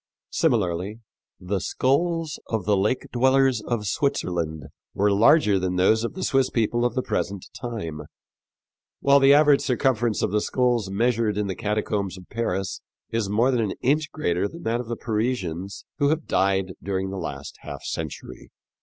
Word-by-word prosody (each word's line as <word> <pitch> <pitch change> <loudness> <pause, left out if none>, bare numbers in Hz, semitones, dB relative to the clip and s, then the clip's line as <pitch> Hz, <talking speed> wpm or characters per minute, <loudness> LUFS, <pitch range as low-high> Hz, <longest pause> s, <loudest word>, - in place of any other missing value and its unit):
Similarly, 105 - 0 0.4
the 95 +2 -2
skulls 160 - 0
of 110 -5 -2
the 105 - +3
lake 105 +6 0
dwellers 130 -1 +3
of 110 -1 -2
Switzerland 85 - -1 0.3
were 105 +1 +3
larger 105 -1 +5
than 90 0 -1
those 110 +5 +3
of 115 - -4
the 185 - -4
Swiss 135 -2 +2
people 120 +1 +1
of 120 - 0
the 130 - 0
present 100 -2 -2
time, 105 -11 -5 1.0
while 140 0 +5
the 135 +1 +7
average 145 -1 +5
circumference 120 -4 +1
of - - 0
the 105 0 +1
skulls 120 -5 +1
measured 110 0 +1
in 105 - 0
the 95 -2 -3
catacombs 105 -3 -2
of 90 - -13
Paris 95 -4 -2 0.3
is 115 -3 -1
more 115 +6 +3
than 125 -3 +1
an 105 -4 -1
inch 150 +4 +1
greater 90 - 0
than 170 +10 -11
that 115 +1 0
of 125 - -5
the 120 0 -4
Parisians 100 -5 -3
who 145 -1 +3
have 155 0 0
died 95 -1 +1
during 95 -1 -2
the 95 - -5
last 70 -3 -6
half 70 -2 -8
century. 80 -3 -6
110 Hz, 170 wpm, -24 LUFS, 95-130 Hz, 1.0 s, the